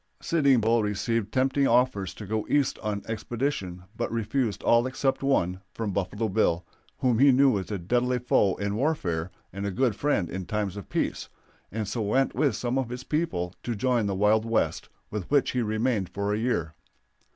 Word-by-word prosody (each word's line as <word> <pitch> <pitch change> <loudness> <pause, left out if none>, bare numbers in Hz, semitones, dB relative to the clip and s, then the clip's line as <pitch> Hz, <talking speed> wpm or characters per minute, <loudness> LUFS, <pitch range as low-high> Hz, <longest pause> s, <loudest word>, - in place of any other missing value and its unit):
Sitting 140 -6 +3
Bull 115 +1 +3
received 105 +1 -1
tempting 135 +2 +2
offers 120 -6 +2
to 105 - -8
go 110 +2 -2
East 145 -2 +1
on 105 -2 -3
exhibition, 110 -5 -3
but 120 - -2
refused 115 0 -1
all 120 +2 +4
except 135 +1 -1
one 95 -10 +1
from 110 -4 -2
Buffalo 100 +4 -1
Bill 90 -4 +1 0.3
whom 125 -3 +1
he 140 +1 +7
knew 130 -4 +4
as 95 - -7
a 105 - -2
deadly 125 +8 +1
foe 105 -5 +2
in 100 0 -2
warfare 95 - -1 0.2
and 100 +1 -5
a 100 - -1
good 115 +2 +1
friend 125 -9 +1
in 95 +1 -5
times 105 -3 -2
of 100 - -8
peace - - -2 0.4
and 110 -1 -3
so 115 - -2
went 130 +6 +1
with 140 -8 +1
some 125 +6 -1
of 130 -3 -2
his 125 +1 -6
people 115 - -1
to 120 - -3
join 120 0 +1
the 100 - -1
Wild 105 +2 +3
West, 115 0 -1 0.2
with 105 -4 -4
which 145 -2 +3
he 125 - 0
remained 110 -2 0
for 100 +1 -2
a - - 0
year. 85 -10 -1
110 Hz, 190 wpm, -27 LUFS, 100-130 Hz, 0.4 s, he